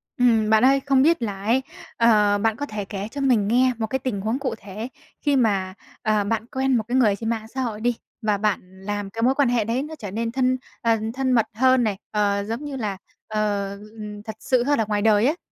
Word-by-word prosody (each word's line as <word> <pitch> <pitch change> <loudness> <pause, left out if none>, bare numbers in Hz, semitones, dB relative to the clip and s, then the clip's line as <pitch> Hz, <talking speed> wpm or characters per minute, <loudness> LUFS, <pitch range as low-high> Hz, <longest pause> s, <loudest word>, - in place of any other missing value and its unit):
Ừm, 230 -4 +3
bạn 220 +1 +5
ơi, 275 +1 +5
không 270 -2 +4
biết 330 +1 +3
là 200 -3 -4
ấy, 245 +5 +2 0.3
ờ, 210 -3 +4
bạn 220 +1 +1
có 290 - -3
thể 210 -6 -5
kể 200 0 -5
cho 285 - -5
mình 240 -7 +3
nghe 250 +4 +4
một 225 -1 -2
cái 265 +4 -1
tình 250 -6 -3
huống 220 +6 -1
cụ 265 -4 -2
thể 210 +3 -7 0.3
khi 290 -2 +2
mà, 200 -7 +1 0.3
ờ, 215 -2 +2
bạn 225 +2 -1
quen 265 -2 +1
một 220 - -1
cái 250 +2 +1
người 215 -6 +4
trên 225 +2 -4
mạng 220 -1 -2
xã 260 +4 -4
hội 220 -4 -3
đi 240 +1 +1 0.3
và 210 -2 +1
bạn 190 -2 -2
làm 205 0 -3
cái 225 +3 -5
mối 255 +3 +3
quan 280 -4 +3
hệ 240 -2 +2
đấy 235 +4 0
nó 310 +2 -7
trở 205 -5 -6
nên 230 +2 -2
thân, 255 +1 +1 0.2
ờ, 230 -1 +3 0.2
thân 265 0 0
mật 230 -3 +4
hơn 255 +2 +4
này, 210 -4 0
ờ, 200 -1 +1
giống 230 +7 -4
như 290 -2 -5
là, 210 -6 -3 0.3
ờ, 210 -2 -1
ừm, 210 -1 -9
thật 220 0 -7
sự 255 -2 +1
hơn 285 +1 +1
ở 225 - +2
ngoài 205 -1 -1
đời 215 0 +4
ấy. 300 +6 +2
225 Hz, 245 wpm, -23 LUFS, 210-255 Hz, 0.3 s, bạn